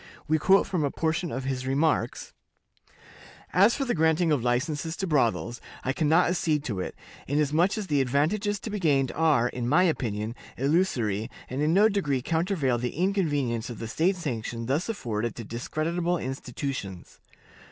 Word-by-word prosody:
We 155 +1 +2
quote 190 +5 +4
a 155 -6 +1
portion 160 +3 -1
of 130 - -3
his 130 -1 -3
remarks: 145 +4 0 1.2
"As 200 +6 +5
for 275 - -1
the 245 - 0
granting 160 +1 +2
of 140 -6 +1
licenses 145 +6 -1
to 195 - -2
brothels, 120 -6 0 0.2
I 135 - 0
can 150 0 0
not 165 +3 +5
accede 160 -4 0
to 105 -9 -3
it, 90 - -4 0.3
inasmuch 150 - +2
as 215 - -3
the 145 -6 +1
advantages 170 - 0
to 220 - -5
be 210 - -2
gained 140 -7 +2
are, 150 -7 +3
in 120 -1 -3
my 175 +6 +5
opinion, 115 - -1 0.2
illusory, 125 - +1 0.2
and 130 +3 -2
in 155 +3 +2
no 210 +3 +6
degree 150 - 0
countervail 160 - 0
the 125 +1 -3
inconvenience 145 - 0
of 120 - -6
the 115 - -5
state 170 - +1
sanction 115 -8 -4
thus 140 - -1
afforded 115 - -3
to 115 - -6
discreditable 165 +10 -2
institutions. 130 - -5
150 Hz, 165 wpm, -27 LUFS, 125-175 Hz, 1.2 s, no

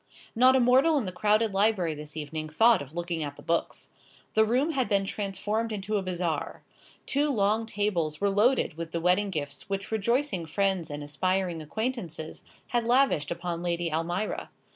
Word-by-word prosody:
Not 255 +3 +6
a - - +5
mortal 260 +6 +4
in 260 - 0
the 185 - -3
crowded 210 +3 +2
library 195 -5 +2
this 150 0 -9
evening 155 +1 -4
thought 225 +7 +4
of 145 +3 -10
looking 170 -1 -3
at 145 -1 -5
the - - -14
books. 170 0 -2 0.4
The 220 - +5
room 255 +8 +1
had 265 -5 0
been 200 -2 +2
transformed 210 +3 -2
into 210 0 -3
a - - 0
bazaar. 175 -4 -3 0.4
Two 290 +2 +1
long 220 -2 +1
tables 185 -8 -1
were 200 0 +2
loaded 210 - +2
with 165 -1 -6
the 170 - 0
wedding 180 +4 +2
gifts 145 0 -5
which 195 +1 -3
rejoicing 220 - 0
friends 190 -1 0
and 145 0 -5
aspiring 180 +3 -1
acquaintances 175 - -4 0.3
had 240 -1 0
lavished 245 - +3
upon 170 0 -3
Lady 170 -2 -1
Almira. 175 +6 -2
195 Hz, 175 wpm, -28 LUFS, 165-225 Hz, 0.4 s, Not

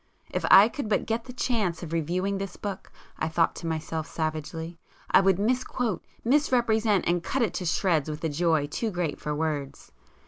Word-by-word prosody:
If - - -2
I 200 +2 +9
could 235 -2 -5
but 210 - +1
get 225 +1 -2
the 250 - -8
chance 220 -9 -1
of 165 -1 -6
reviewing 180 +5 -1
this 195 -1 -5
book, 200 -2 -6 0.3
I 155 - 0
thought 165 +1 +2
to 170 - -5
myself 160 0 -3
savagely!—I 160 +3 -2
would 190 -2 +3
misquote, 240 -2 -1 0.2
misrepresent, 230 - +2
and 175 0 +2
cut 255 +9 0
it 215 - 0
to 180 - -3
shreds 160 -3 +1
with 150 +2 -6
a 160 - +1
joy 160 -1 +1
too 220 +10 -2
great 175 -6 -2
for 150 0 -2
words! 150 -3 -3
175 Hz, 180 wpm, -27 LUFS, 160-220 Hz, 0.3 s, I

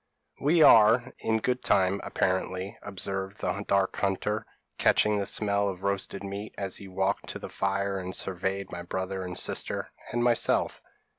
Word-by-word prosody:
p> - - -8
"'We 165 +3 +5
are 115 +2 +6
in 110 - +1
good 125 +2 -1
time, 95 +1 +2
apparently,' 95 +1 -1
observed 95 0 -4
the 95 +3 -2
dark 100 -1 +1
hunter, 100 +2 -1 0.3
catching 105 -1 +3
the 100 - -2
smell 100 -1 +2
of 95 - -5
the - - -6
roasted 100 0 -2
meat, 100 +2 -6
as 95 -2 -2
he 100 - -10
walked 95 +2 -1
to - - -4
the - - -8
fire 100 0 -1
and 95 0 -5
surveyed 95 +1 -3
my 90 - -5
brother 95 +2 -3
and 90 -1 -4
sister, - - -2 0.2
and 120 +1 0
myself. 120 -1 +2
100 Hz, 170 wpm, -28 LUFS, 95-105 Hz, 0.3 s, are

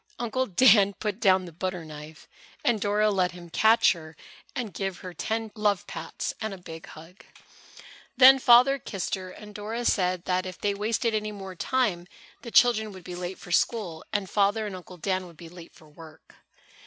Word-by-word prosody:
Uncle 245 +2 -1
Dan 200 0 +5
put 210 0 -4
down 190 -4 +3
the 175 - -10
butter 180 0 -4
knife 150 0 -11 0.4
and 230 -4 +2
Dora 210 +1 +2
let 185 -2 0
him 175 -1 -12
catch 220 +6 +5
her 160 -3 -8 0.4
and 225 -5 -4
give 195 -2 -4
her 180 - -7
ten 220 +3 -3
love 210 -3 0
pats - - -5
and 220 -3 -3
a - - -12
big 165 -2 -10
hug. 165 +4 -14 0.9
Then 265 +1 +9
Father 255 +3 +6
kissed 195 -6 -5
her, 185 -1 -3
and 210 +2 -12
Mother 225 +3 -4
said 180 -4 +1
if 185 0 -1
they 205 -1 0
wasted 220 +3 -1
any 215 0 -2
more 195 -2 -8
time 185 -4 -1 0.3
the 235 - -8
children 220 -3 +4
would 185 -1 -12
be 180 - -8
late 180 +1 -5
for 175 - -11
school 180 -4 0
and 205 -3 -1
Father 205 +3 +1
and 200 -2 -5
Uncle 180 0 -11
Dan 185 +1 -2
would 170 -2 -16
be 170 0 -11
late 170 -1 -13
for 155 - -18
work. 160 +1 -15
195 Hz, 190 wpm, -26 LUFS, 175-220 Hz, 0.9 s, Then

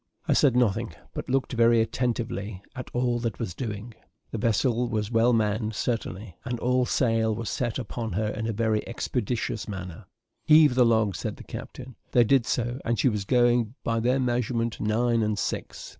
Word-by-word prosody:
I - - +4
said 135 -4 +4
nothing, 120 -6 +1 0.2
but - - -6
looked 135 0 0
very 115 -1 +4
attentively 110 -4 -2
to 130 - -4
all 120 -1 0
that 115 -1 -3
was 110 -7 -4
doing. 110 +1 -5 0.4
The 115 - -3
vessel 115 +2 +1
was 105 0 -2
well 115 +1 +4
manned, 110 -1 0
certainly, 110 -6 -3
and 120 -1 -3
all 125 +1 +1
sail 115 -3 +1
was 115 0 -4
set 120 -3 -2
upon 115 -3 -4
her 105 +3 0
in 110 +1 -3
a - - 0
very 110 0 +1
expeditious 120 -2 -2
manner. 95 -5 -7 0.4
"Heave 150 -3 +6
the 125 -1 +4
log," 110 -4 +2
said - - -4
the - - -10
captain. 130 -2 -9 0.2
They 120 - +6
did 120 0 +3
so; 120 +1 -1
and 115 0 0
she 130 - +3
was 105 -4 -2
going, 120 -1 +2
by 115 0 0
their 125 +4 +2
measurement, 120 -2 -1
nine 115 +2 +1
and 105 -1 0
six. - - -4
115 Hz, 185 wpm, -26 LUFS, 110-125 Hz, 0.4 s, Heave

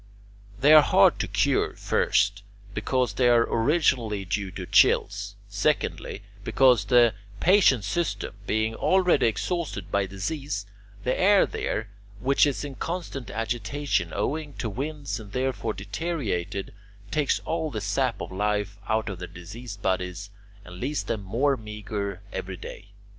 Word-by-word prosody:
They 145 +4 +6
are 155 - +10
hard - - +4
to - - -1
cure, - - +1
first, 105 0 +1 0.3
because 120 +2 0
they 120 +4 +3
are 120 -1 +5
originally 115 - +1
due 100 +1 -2
to - - -7
chills; - - +3
secondly, 100 - -1 0.2
because 120 -1 +4
the 120 0 +5 0.3
patient's 170 - +4
system 170 - -2
being 110 +1 +1
already 180 +3 +3
exhausted 115 - -2
by 100 -1 +1
disease, 100 +4 -4 0.4
the 125 - +1
air 200 +1 +5
there, 110 - -3 0.3
which 135 +5 +3
is 145 +1 -2
in 140 - -6
constant 165 -4 -5
agitation 115 - -1
owing 145 +8 -2
to 110 -4 -4
winds 140 +3 -4
and 105 -2 -11
therefore 130 -4 -1
deteriorated, 100 - -3 0.4
takes 150 +1 +2
all 160 -1 -2
the 110 - -4
sap 115 +5 0
of - - -6
life 105 0 -1
out 110 0 +1
of 95 -4 -5
their 90 - -6
diseased 100 +5 -9
bodies 95 +1 -2 0.3
and 90 0 -10
leaves 145 +6 -2
them 110 - -3
more 120 +9 +1
meagre 105 -3 -5
every 95 0 -5
day. 100 - -9
115 Hz, 140 wpm, -26 LUFS, 100-140 Hz, 0.4 s, are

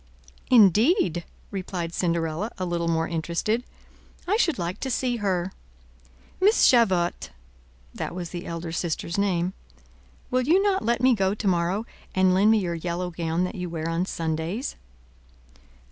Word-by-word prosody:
"Indeed!" 215 - +4 0.3
replied 180 -4 -4
Cinderella, 170 +3 -1
a 185 - -2
little 170 -1 -1
more 165 0 +1
interested; 170 +8 -1 0.6
"I 400 - +2
should 355 -8 +2
like 175 0 -3
to 265 - -3
see 245 0 0
her. 190 -3 -1 0.9
Miss 410 +4 +5
Javotte"—that 60 - -2
was 175 -2 -5
the 175 -1 -6
elder 170 0 -5
sister's 170 +2 -2
name—"will 65 - -3
you 320 +9 +4
not 390 -2 +1
let 235 0 +1
me 255 0 +5
go 195 -2 +1
to 210 - -3
morrow, 180 +4 +1 0.3
and 185 -1 +4
lend 200 +3 +4
me 220 - +5
your 180 -4 -1
yellow 175 +2 -3
gown 165 +1 -1
that 180 - -2
you 180 -4 -5
wear 165 -1 -4
on 165 +2 -1
Sundays?" 165 - -3
180 Hz, 145 wpm, -25 LUFS, 165-210 Hz, 0.9 s, Miss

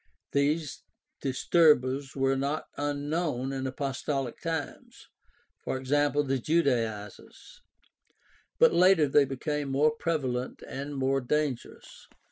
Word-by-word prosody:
These 145 +1 0 0.4
disturbers 135 -1 +2
were 135 0 +1
not 140 +3 -2
unknown 145 -2 -2
in 135 0 -3
apostolic 135 -1 -3
times 165 -3 -5 0.7
(e.g., 130 0 -5
the 145 -2 +1
Judaizers), 115 - -2 1.0
but - - +5
later 175 -3 +5
they 140 +1 +4
became 145 +2 -3
more 145 +3 +3
prevalent 135 -6 -3
and 140 +2 -6
more 135 0 +1
dangerous. 145 -1 -3
140 Hz, 95 wpm, -28 LUFS, 130-150 Hz, 1.0 s, but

